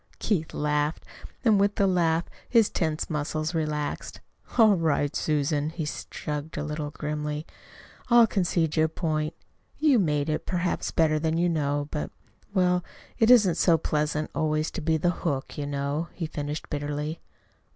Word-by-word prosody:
Keith 175 -8 -1
laughed 150 +1 0 0.4
and 215 -4 +5
with 200 +1 +2
the 200 - +3
laugh 170 -3 +2 0.3
his 230 -4 +4
tense 160 -2 -1
muscles 155 +1 -2
relaxed. 155 -2 -3 0.4
"All 220 -3 +7
right, 155 -4 0
Susan," 150 0 0
he 160 -1 -4
shrugged 150 0 -5
a 145 - -1
little 150 0 -3
grimly. 150 0 -4 0.6
"I'll 235 -1 +8
concede 175 -6 0
your 160 -1 +4
point. 155 -1 -2 0.4
You 295 -6 +4
made 150 -5 +1
it 155 -1 -2
perhaps 180 -1 -1
better 155 -2 +2
than 160 +1 0
you 175 +1 +2
know. 145 -3 0
But 150 - -3 0.4
well, 180 -2 +2 0.4
it 225 -1 +4
isn't 205 -9 +6
so 165 -1 +4
pleasant 150 0 -1
always 155 0 0
to 185 - -5
be 160 +1 +2
the 175 +3 +2
hook, 140 -6 -2
you 145 -1 -3
know," 145 +3 -2
he 170 - -4
finished 150 -1 -5
bitterly. 150 +2 -3
155 Hz, 155 wpm, -27 LUFS, 150-175 Hz, 0.6 s, I'll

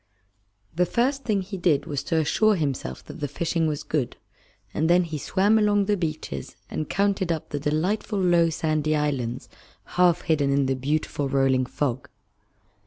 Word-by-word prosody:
The 180 +1 +2
first 270 - 0
thing 205 -4 +1
he 195 +1 -6
did 155 -5 +2
was 145 -4 -3
to 165 - 0
assure 210 +7 +3
himself 140 - -3
that - - -10
the 145 - -2
fishing 165 +3 -1
was 150 -2 -2
good, 145 -6 -2 0.6
and 160 +2 0
then 180 +1 +5
he 160 -3 -5
swam 205 +8 +2
along 205 -1 +3
the 205 +1 +2
beaches 155 - -4 0.2
and 155 - -3
counted 195 -2 +1
up 160 -2 -3
the 145 - -3
delightful 175 +9 -1
low 175 -2 +4
sandy 155 -1 0
islands 135 -4 -2 0.4
half 175 -1 +3
hidden 155 -4 +1
in 140 0 +2
the 135 0 0
beautiful 145 +1 -1
rolling 135 -2 +2
fog. 130 -2 -2
155 Hz, 170 wpm, -25 LUFS, 145-185 Hz, 0.6 s, then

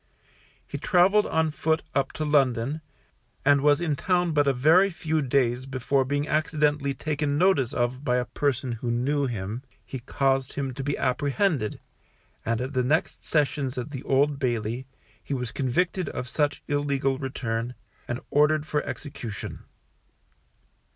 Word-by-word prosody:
He - - -5
travelled 195 +3 +4
on 160 -1 +1
foot 160 +1 0
up 140 - +1
to 155 - -3
London, 140 0 +2 0.6
and 140 0 +5
was 145 +1 +4
in 165 -4 0
town 175 +2 +1
but 145 -2 +2
a - - +5
very 160 +9 +5
few 160 -3 -1
days 130 -1 +1
before 135 +1 +1
being 145 +2 -1
accidentally 150 -2 +1
taken 145 0 -1
notice 170 -8 +3
of 125 +2 -1
by 125 -4 +1
a 125 - 0
person 135 -3 -1
who 120 +1 -3
knew 135 +4 +1
him, 110 0 -4 0.2
he 130 - -6
caused 135 +1 0
him 135 -2 -3
to 135 - -5
be 145 +1 -1
apprehended, 140 - 0 0.6
and 115 0 -1
at 130 +2 -4
the 130 - +2
next 150 +6 0
sessions 140 -3 0
at 125 +4 -4
the 135 -3 -5
Old 140 +1 +2
Bailey, 120 -1 -1 0.4
he 140 - -3
was 125 -3 -3
convicted 175 +6 0
of 125 - -5
such 145 +3 0
illegal 140 -2 0
return, 120 -3 -3 0.3
and 120 +1 -3
ordered 150 +1 +3
for 150 -1 0
execution. 140 -10 -6
140 Hz, 155 wpm, -26 LUFS, 125-150 Hz, 0.6 s, and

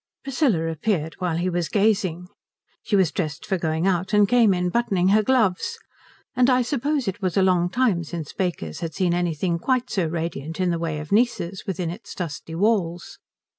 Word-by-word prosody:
Priscilla 250 - +1
appeared 160 0 -1
while 175 -3 -1
he 175 +2 -1
was 175 -2 -1
gazing. 195 -5 +1 0.5
She 210 - -1
was 190 -5 +3
dressed 155 -6 -3
for 190 -3 -1
going 160 +1 -1
out 185 +1 0
and 210 -1 +5
came 235 -2 +4
in 180 -1 0
buttoning 195 -4 +1
her 215 +2 +5
gloves, 245 - +1 0.6
and 250 +1 +4
I 255 -1 +4
suppose 280 0 -1
it 195 +1 -3
was 185 0 -1
a 195 - +5
long 180 -2 +3
time 220 -7 +1
since 160 -2 -6
Baker's 165 - -3
had 160 -3 -5
seen 180 0 +1
anything 175 0 0
quite 255 +5 0
so 185 -5 0
radiant 160 -1 -4
in 180 -1 +2
the 170 - -1
way 165 -2 -2
of 150 0 -7
nieces 200 -4 0
within 180 -3 -2
its 200 +7 -9
dusty 160 -2 -5
walls. 180 -3 0
180 Hz, 190 wpm, -23 LUFS, 170-215 Hz, 0.6 s, and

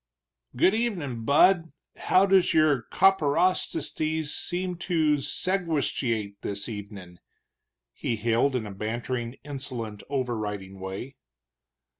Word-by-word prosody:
"Good 185 +10 +4
evenin', 170 - -2
bud. 165 +3 +4 0.2
How 185 +1 +4
does 190 -2 +4
your 150 -6 +3
copperosticies 160 -3 +2
seems 180 0 -3
to 160 -4 +2
segastuate 140 - -1
this 100 0 -3
evenin'?" 100 -5 -8 0.7
he 115 - -2
hailed, 115 +5 +1
in 120 -3 -1
a 105 - -6
bantering, 120 +4 -3
insolent, 130 -7 -5
overriding 105 -8 -3
way. 95 +8 -6
135 Hz, 100 wpm, -27 LUFS, 110-165 Hz, 0.7 s, Good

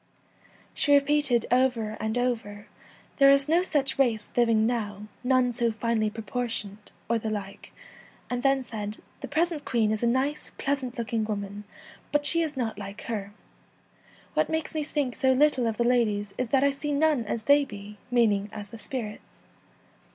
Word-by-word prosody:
She 285 -1 +3
repeated 280 -4 +3
over 245 -4 +2
and 220 +2 -2
over, 245 -4 -1
1 205 +1 -13 0.5
There 275 -1 +7
is 275 0 +5
no 330 +3 +4
such 290 -7 0
race 225 -6 +1
living 230 -2 +3
now, 210 -4 -2 0.2
none 255 -1 +3
so 235 -1 0
finely 220 -1 0
proportioned,' 220 -2 -5 0.2
or 230 0 +1
the 220 - -3
like, 200 -2 -6 0.6
and 245 0 -2
then 270 0 +2
said, 210 -3 -6
' - - -33
The - - -5
present 320 0 0
Queen 225 -5 +1
l - - +2
is 215 - -3
a 235 - +2
nice, 265 +5 -1
pleasant 275 -3 -2
looking 230 -1 -1
woman, 205 -1 -5 0.5
but 295 0 +1
she 335 +3 +5
is 305 -4 -3
not 225 -5 -2
like 200 0 -7
her. 205 -3 -4 1.0
What - - +1
makes 320 0 -2
me 310 - -1
think 290 -4 -2
so 260 0 +3
little 265 -3 +3
of 220 -1 -2
the 235 - +2
ladies 215 -5 +1
is 255 - -2
that 265 +3 +2
I 280 - +4
see 290 +1 -3
none 295 -3 +2
as 220 +1 -3
they 285 +4 +5
be,' 205 -4 -10
meaning 210 -5 +2
as 205 -2 -8
the 230 - -10
spirits. 220 -4 -7
240 Hz, 180 wpm, -27 LUFS, 215-275 Hz, 1.0 s, There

